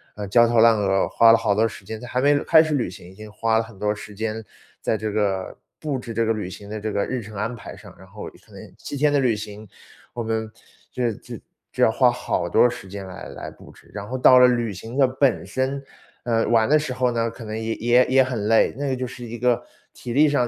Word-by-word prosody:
呃， 105 Hz, -1 st, -5 dB
焦 120 Hz, +4 st, +5 dB
头 120 Hz, -1 st, +2 dB
烂 115 Hz, 0 st, +6 dB
额， 95 Hz, -1 st, +1 dB
花 115 Hz, -1 st, +5 dB
了 115 Hz, -, +6 dB
好 110 Hz, -3 st, +1 dB
多 110 Hz, +2 st, +3 dB
时 100 Hz, -, -10 dB
间， 110 Hz, +1 st, -6 dB
在 125 Hz, -, -9 dB
还 125 Hz, -, -2 dB
没 145 Hz, +1 st, +4 dB
开 160 Hz, -1 st, +6 dB
始 155 Hz, -1 st, -2 dB
旅 125 Hz, -8 st, 0 dB
行， 90 Hz, -1 st, -12 dB
已 -, -, -15 dB
经 110 Hz, 0 st, -11 dB
花 110 Hz, +1 st, 0 dB
了 -, -, -1 dB
很 110 Hz, -2 st, -14 dB
多 105 Hz, +1 st, 0 dB
时 105 Hz, -, -10 dB
间 110 Hz, +1 st, -4 dB, 0.4 s
在 -, -, 0 dB
这 110 Hz, 0 st, -3 dB
个 100 Hz, -3 st, -2 dB, 0.2 s
布 145 Hz, -3 st, -2 dB
置 120 Hz, -2 st, -7 dB
这 115 Hz, +1 st, 0 dB
个 115 Hz, -, +1 dB
旅 105 Hz, -4 st, -3 dB
行 100 Hz, +2 st, -10 dB
的 110 Hz, 0 st, -5 dB
这 110 Hz, +1 st, -4 dB
个 100 Hz, -, 0 dB
日 130 Hz, -, -3 dB
程 105 Hz, 0 st, -11 dB
安 110 Hz, +5 st, -3 dB
排 -, -, -10 dB
上， -, -, -14 dB
然 -, -, -15 dB
后 -, -, -10 dB, 0.2 s
可 -, -, -23 dB
能 -, -, -12 dB
7 -, -, -7 dB
天 145 Hz, +1 st, +2 dB
的 145 Hz, -, +3 dB
旅 125 Hz, -5 st, +2 dB
行， 105 Hz, 0 st, -8 dB, 0.5 s
我 120 Hz, -, -4 dB
们 110 Hz, -1 st, -3 dB, 0.4 s
就 125 Hz, -, -3 dB
是 115 Hz, -3 st, 0 dB
就 -, -, -10 dB, 0.4 s
就 -, -, +1 dB
要 -, -, +6 dB
花 -, -, +3 dB
好 -, -, -2 dB
多 120 Hz, -, +4 dB
时 120 Hz, -5 st, -9 dB
间 95 Hz, 0 st, -8 dB
来 90 Hz, -, -9 dB
来 -, -, -8 dB
布 -, -, -15 dB
置。 -, -, -21 dB
然 100 Hz, 0 st, -6 dB
后 130 Hz, -, -5 dB
到 130 Hz, 0 st, +6 dB
了 125 Hz, -, +8 dB
旅 120 Hz, -3 st, 0 dB
行 110 Hz, +6 st, -9 dB
的 135 Hz, -2 st, +4 dB
本 130 Hz, -1 st, +1 dB
身， 135 Hz, +1 st, -3 dB, 0.4 s
呃， 115 Hz, -2 st, 0 dB
玩 115 Hz, 0 st, +3 dB
的 155 Hz, -, +5 dB
时 150 Hz, -4 st, -3 dB
候 125 Hz, -1 st, +1 dB
呢， 115 Hz, -1 st, -1 dB
可 115 Hz, -, -11 dB
能 110 Hz, 0 st, -5 dB
也 110 Hz, 0 st, -2 dB
也 120 Hz, +2 st, +3 dB
也 130 Hz, 0 st, +4 dB
很 120 Hz, -5 st, -3 dB
累， 115 Hz, 0 st, +3 dB
那 140 Hz, 0 st, -3 dB
个 130 Hz, -, 0 dB
就 130 Hz, -, -3 dB
是 125 Hz, 0 st, -10 dB
一 120 Hz, +1 st, -7 dB
个 125 Hz, 0 st, +2 dB, 0.3 s
体 120 Hz, -, -7 dB
力 150 Hz, +4 st, +5 dB
上 145 Hz, -4 st, +2 dB
115 Hz, 285 characters per minute, -23 LUFS, 105-125 Hz, 0.5 s, 了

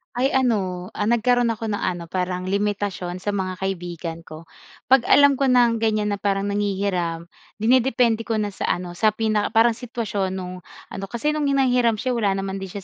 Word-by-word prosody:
Ay, 250 Hz, +2 st, +2 dB
ano, 190 Hz, -8 st, 0 dB
ah, 210 Hz, -, -2 dB
nagkaroon 240 Hz, +1 st, +3 dB
ako 220 Hz, 0 st, -4 dB
ng 205 Hz, -, -2 dB
ano, 175 Hz, -2 st, -2 dB
parang 180 Hz, +1 st, -3 dB
limitasyon 195 Hz, -2 st, -2 dB
sa 205 Hz, -, 0 dB
mga 190 Hz, -2 st, -2 dB
kaibigan 175 Hz, -3 st, -4 dB
ko. 155 Hz, +1 st, -10 dB, 0.5 s
'Pag 265 Hz, -3 st, +5 dB
alam 280 Hz, -1 st, +5 dB
ko 275 Hz, -, +2 dB
ng 240 Hz, -2 st, +4 dB
ganiyan 215 Hz, -2 st, 0 dB
na 200 Hz, -, -2 dB
parang 200 Hz, 0 st, 0 dB
nanghihiram, 190 Hz, -5 st, -2 dB, 0.2 s
dinidepende 230 Hz, 0 st, +2 dB
ko 225 Hz, -, 0 dB
na 210 Hz, -1 st, -1 dB
sa -, -, -4 dB
ano, 180 Hz, 0 st, -7 dB
sa 215 Hz, +5 st, +1 dB
pinaka 215 Hz, 0 st, 0 dB
parang 230 Hz, +1 st, +6 dB
sitwasyon 220 Hz, -5 st, -3 dB
no'ng 180 Hz, -1 st, -6 dB, 0.3 s
ano. 195 Hz, -, -6 dB
Kasi 235 Hz, +8 st, -1 dB
no'ng 300 Hz, -1 st, -1 dB
hanghiram 250 Hz, -4 st, +3 dB
siya 250 Hz, +4 st, -2 dB
eh -, -, -1 dB
wala 200 Hz, -3 st, +1 dB
din 195 Hz, -, -3 dB
naman 195 Hz, 0 st, -4 dB
siya 195 Hz, 0 st, -7 dB
205 Hz, 190 wpm, -22 LUFS, 185-235 Hz, 0.5 s, parang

